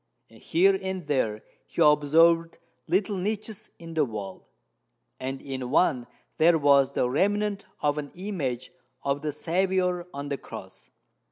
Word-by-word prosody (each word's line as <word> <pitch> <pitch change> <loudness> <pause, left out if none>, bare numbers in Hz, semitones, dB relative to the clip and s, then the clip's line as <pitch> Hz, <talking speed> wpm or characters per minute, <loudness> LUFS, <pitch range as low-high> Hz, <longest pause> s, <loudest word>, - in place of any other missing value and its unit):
Here 190 +4 +3
and 190 -2 -4
there 115 -7 0 0.2
he - - -8
observed 165 +3 +4 0.3
little 200 +2 +1
niches 210 +2 -4
in 165 -1 -10
the 160 -2 +3
wall; 100 -7 -6 0.7
and 135 +1 -4
in 130 -2 -5
one 130 -4 +2 0.3
there 165 +1 +6
was 140 -2 +4
the 125 - +1
remnant 200 +8 0 0.2
of 145 0 +1
an 145 -1 -6
image 150 - -4 0.3
of 140 0 -1
the 155 - -2
Saviour 180 +2 0
on 140 +1 -6
the 140 - -3
cross. - - -11
155 Hz, 140 wpm, -27 LUFS, 140-185 Hz, 0.7 s, there